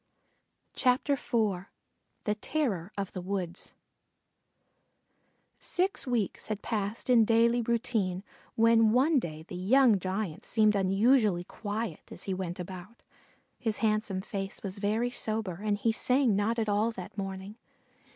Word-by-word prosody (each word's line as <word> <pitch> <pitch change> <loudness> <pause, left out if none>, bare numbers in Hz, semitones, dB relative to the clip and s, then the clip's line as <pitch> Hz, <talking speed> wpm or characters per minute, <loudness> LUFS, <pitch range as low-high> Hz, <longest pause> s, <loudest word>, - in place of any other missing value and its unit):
IV 250 -1 +5 1.2
THE 210 - +1
TERROR 210 - -2
OF 195 -2 -3
THE 185 - -5
WOODS 180 -1 -4 1.9
Six 370 -4 0
weeks 235 -6 -1
had 215 -1 -4
passed 210 0 -3
in 245 -3 +6
daily 230 +2 +3
routine 220 -5 0 0.3
when 225 -1 +5
one 275 +4 +4
day 155 -7 -6
the - - -12
young 220 +4 +4
giant 185 -2 -3
seemed 215 -2 +3
unusually 200 0 +3
quiet 215 +4 -5
as - - -8
he 195 - -2
went 185 -1 -4
about. 185 +5 -8 0.6
His 225 -4 0
handsome 215 -3 0
face 195 -1 -5
was 195 0 -4
very 220 +4 0
sober 215 -7 -3
and 210 -1 +1
he 225 +2 +1
sang 250 0 +2
not 210 +4 +1
at 225 -2 0
all 210 +2 +2
that 185 -1 -8
morning. 195 +1 -5
210 Hz, 130 wpm, -29 LUFS, 190-230 Hz, 1.9 s, in